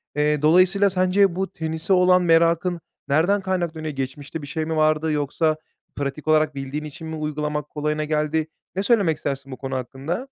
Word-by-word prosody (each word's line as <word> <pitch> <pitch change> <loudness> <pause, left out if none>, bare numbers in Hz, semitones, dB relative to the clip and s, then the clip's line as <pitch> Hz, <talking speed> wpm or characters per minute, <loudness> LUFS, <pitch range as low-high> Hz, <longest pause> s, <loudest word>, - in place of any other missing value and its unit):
Eee, 150 0 +1
dolayısıyla, 185 +5 +5
sence 185 0 +2
bu 190 0 -2
tenise 160 +1 -2
olan 180 0 +5
merakın 170 +1 +3 0.3
nereden 170 +8 +2
kaynaklanıyor? 170 -5 -2
Geçmişte 140 +4 -5
bir 145 - -8
şey 160 +1 -3
mi 160 - -2
vardı, 155 0 +2
yoksa 150 +2 0 0.4
pratik 145 +2 -4
olarak 155 -2 +3
bildiğin 135 +2 -4
için 155 +2 -8
mi 160 - -5
uygulamak 150 -1 -3
kolayına 150 +1 -2
geldi? 155 +1 0 0.3
Ne 195 - -1
söylemek 200 -10 +3
istersin 140 -1 -4
bu 130 - -6
konu 135 -1 -4
hakkında? 135 - -4
155 Hz, 170 wpm, -23 LUFS, 150-175 Hz, 0.4 s, dolayısıyla